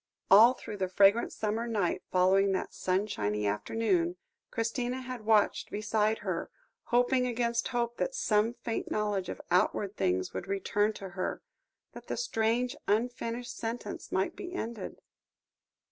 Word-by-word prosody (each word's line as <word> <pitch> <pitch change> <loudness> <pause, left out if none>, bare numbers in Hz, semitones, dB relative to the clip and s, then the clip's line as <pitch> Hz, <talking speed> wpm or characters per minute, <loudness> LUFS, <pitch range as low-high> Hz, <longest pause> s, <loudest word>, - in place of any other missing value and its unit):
All 225 +6 +9
through 210 - -7
the 190 -1 0
fragrant 200 +4 +4
summer 220 +2 -2
night 205 -6 0
following 190 +2 +4
that 185 - -2
sunshiny 105 - -1
afternoon, 175 - 0 0.3
Christina 240 +3 -2
had 250 -4 -7
watched 215 -2 +3
beside 215 +1 +1
her, - - -2 0.4
hoping 250 +1 +2
against 235 -1 0
hope 240 -1 -1
that - - -1
some 225 - +2
faint 230 -2 -4
knowledge 205 -3 -1
of - - -5
outward 190 +3 +2
things 90 - 0
would - - -5
return 200 +2 +1
to 195 -2 -8
her, 185 +1 -4 0.5
that - - -11
the - - -3
strange 245 - 0
unfinished 240 +2 -1
sentence 230 +1 -5
might - - 0
be 360 -1 -7
ended. 225 - -5
220 Hz, 140 wpm, -30 LUFS, 195-235 Hz, 0.5 s, All